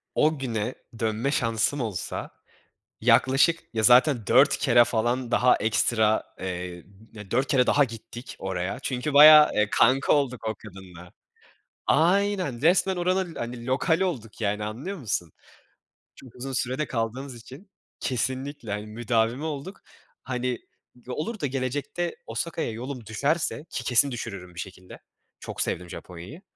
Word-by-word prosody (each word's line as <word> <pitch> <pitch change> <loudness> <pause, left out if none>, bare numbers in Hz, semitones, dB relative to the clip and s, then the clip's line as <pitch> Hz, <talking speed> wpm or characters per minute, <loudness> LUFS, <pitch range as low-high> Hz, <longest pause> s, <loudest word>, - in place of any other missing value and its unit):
O 155 -1 +2
güne, 120 -2 -3 0.2
dönme 115 +4 -1
şansım 115 +3 0
olsa, 105 -7 -4 0.7
yaklaşık 140 +6 +4
ya, 110 -1 -1
zaten 125 0 +5
4 - - +5
kere 120 - +5
falan 120 +2 -1
daha 125 0 +4
ekstra 110 0 +1 0.2
eee, 90 -2 -5 0.5
4, 130 +3 +1
kere 125 -3 +3
daha 145 - +4
gittik 120 +1 -8
oraya. 95 0 -3
Çünkü 130 +3 -3
bayağı, 150 +1 +9
eee, 105 0 +1
kanka 130 +3 +4
olduk 125 -6 0
o 110 - -2
kadınla. 90 -4 -13 0.8
Aynen 180 -5 +2
resmen 185 +3 +3
oranın 180 -1 0
hani 120 0 -6
lokali 160 +8 +1
olduk. 115 - -5
Yani 105 0 -1
anlıyor 135 - -5
musun? 95 - -3 0.8
Çok 125 -3 -15
uzun 135 +2 -6
sürede 130 +4 -1
kaldığımız 125 +3 -3
için 135 - -13 0.3
Kesinlikle. 130 -1 -3
Hani, 105 +1 -4
müdavimi 115 +4 -1
olduk. 155 +5 -5 0.4
Hani, 125 -1 -2 0.5
olur 170 - -4
da 145 - -1
gelecekte 140 +6 -3
Osaka'ya 135 +3 -3
yolum 125 +1 -7
düşerse, 145 +8 -1
ki 120 - -4
kesin 130 +3 +3
düşürürüm 90 -6 -7
bir - - -8
şekilde 95 0 -9 0.4
Çok - - -6
sevdim 90 0 -2
Japonya'yı. 90 - -10
125 Hz, 135 wpm, -26 LUFS, 110-145 Hz, 0.8 s, bayağı